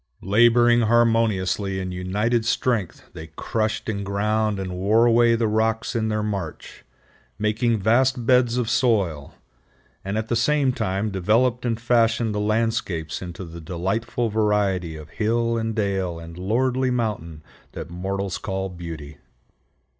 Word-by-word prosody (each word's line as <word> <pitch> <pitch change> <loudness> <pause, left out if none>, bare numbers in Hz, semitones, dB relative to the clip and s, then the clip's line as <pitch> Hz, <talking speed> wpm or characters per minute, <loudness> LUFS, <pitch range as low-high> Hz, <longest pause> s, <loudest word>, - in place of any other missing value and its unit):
Laboring 120 +4 +4
harmoniously 110 -4 +2
in 95 -1 -4
united 105 +6 0
strength 115 -4 -1
they 80 - -8
crushed 110 +7 -3
and 100 -2 -2
ground 105 +1 0
and 95 -1 -4
wore 105 +6 +3
away 120 0 +4
the 115 -1 +1
rocks 110 +2 0
in 110 -1 0
their 105 0 -1
march, 100 -7 -5 0.5
making 110 +2 +1
vast 120 +4 +2
beds 125 -1 +3
of 125 -3 0
soil, 100 - 0 0.7
and 100 +2 -3
at 110 0 -2
the 120 - 0
same 145 +2 +2
time 105 -3 -2
developed 115 +6 +1
and 115 -1 -1
fashioned 115 -2 +2
the 105 - -2
landscapes 105 -7 -1
into 90 0 -7
the 85 0 -10
delightful 110 +8 -2
variety 105 -6 0
of 75 0 -10
hill 115 +2 0
and 115 -1 -2
dale 95 -5 -1
and 85 0 -10
lordly 125 +8 0
mountain 105 -11 -3 0.3
that - - -7
mortals 95 +1 -3
call 95 -1 -3
beauty. 80 -4 -8
110 Hz, 140 wpm, -23 LUFS, 95-115 Hz, 0.7 s, Laboring